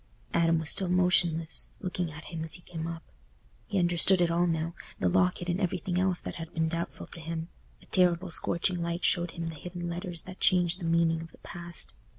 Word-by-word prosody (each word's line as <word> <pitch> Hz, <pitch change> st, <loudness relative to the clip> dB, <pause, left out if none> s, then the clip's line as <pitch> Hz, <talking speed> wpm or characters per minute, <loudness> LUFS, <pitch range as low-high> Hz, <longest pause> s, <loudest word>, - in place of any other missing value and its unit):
Adam 165 Hz, -1 st, +3 dB
was 160 Hz, -2 st, -2 dB
still 190 Hz, -3 st, +3 dB
motionless, 180 Hz, -3 st, +2 dB
looking 180 Hz, -3 st, -3 dB
at 155 Hz, +1 st, -10 dB
him 165 Hz, -2 st, -5 dB
as 160 Hz, -, -4 dB
he 175 Hz, -, -13 dB
came 165 Hz, -2 st, -5 dB
up. 165 Hz, -1 st, -6 dB, 0.6 s
He 200 Hz, -, -1 dB
understood 175 Hz, +1 st, +5 dB
it 175 Hz, -1 st, +3 dB
all 175 Hz, +1 st, +2 dB
now—the 160 Hz, -, -2 dB
locket 90 Hz, -, +2 dB
and 180 Hz, +3 st, 0 dB
everything 180 Hz, -1 st, -1 dB
else 185 Hz, -1 st, +2 dB
that -, -, -6 dB
had 165 Hz, 0 st, -7 dB
been 160 Hz, -1 st, +1 dB
doubtful 170 Hz, +1 st, -4 dB
to -, -, -9 dB
him: 165 Hz, +1 st, -5 dB, 0.3 s
a -, -, -17 dB
terrible 180 Hz, -1 st, +2 dB
scorching 170 Hz, +2 st, +1 dB
light 170 Hz, +1 st, -1 dB
showed 175 Hz, -1 st, +3 dB
him 165 Hz, -1 st, -3 dB
the -, -, -6 dB
hidden 175 Hz, +3 st, -6 dB
letters 170 Hz, -1 st, -3 dB
that 185 Hz, 0 st, -10 dB
changed 180 Hz, -1 st, +3 dB
the 175 Hz, -, -5 dB
meaning 165 Hz, -1 st, +2 dB
of 165 Hz, -, -10 dB
the -, -, -17 dB
past. 170 Hz, -, +1 dB
170 Hz, 205 wpm, -29 LUFS, 165-180 Hz, 0.6 s, understood